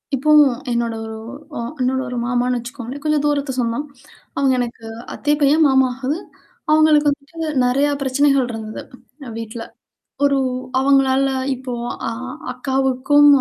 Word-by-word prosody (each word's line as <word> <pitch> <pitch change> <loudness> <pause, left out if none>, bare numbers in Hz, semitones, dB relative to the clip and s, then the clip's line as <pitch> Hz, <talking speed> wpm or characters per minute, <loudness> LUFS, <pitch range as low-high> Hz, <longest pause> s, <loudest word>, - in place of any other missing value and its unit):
இப்போ 290 +4 +1 0.4
என்னோட 235 -1 0
ஒரு 220 0 -6 0.4
ஒ - - -3 0.2
என்னோட 260 +1 +1
ஒரு 245 0 -4
மாமான்னு 245 +1 0
வச்சுக்கோங்களேன். 250 +2 -7
கொஞ்சம் 305 -1 +2
தூரத்து 290 -2 0
சொந்தம். 235 +5 -1 0.5
அவுங்க 270 -1 +3
எனக்கு 235 -1 -4 0.3
அத்தை 295 +1 0
பையன், 295 +3 +5
மாமா 265 -1 +4
ஆகுது. 270 +5 -2 0.5
அவங்களுக்கு 305 -1 +5
வந்துட்டு 285 +3 -6 0.3
நெறைய 270 +4 +2
பிரச்சனைகள் 275 -1 +2
இருந்தது 220 -1 -6 0.6
வீட்ல. 225 0 -6 0.6
ஒரு 280 -1 +3 0.4
அவங்களால 270 0 +3 0.3
இப்போ 255 0 -6 0.3
அ - - 0 0.4
அக்காவுக்கும் 265 +2 +3
265 Hz, 125 wpm, -20 LUFS, 245-285 Hz, 0.6 s, பையன்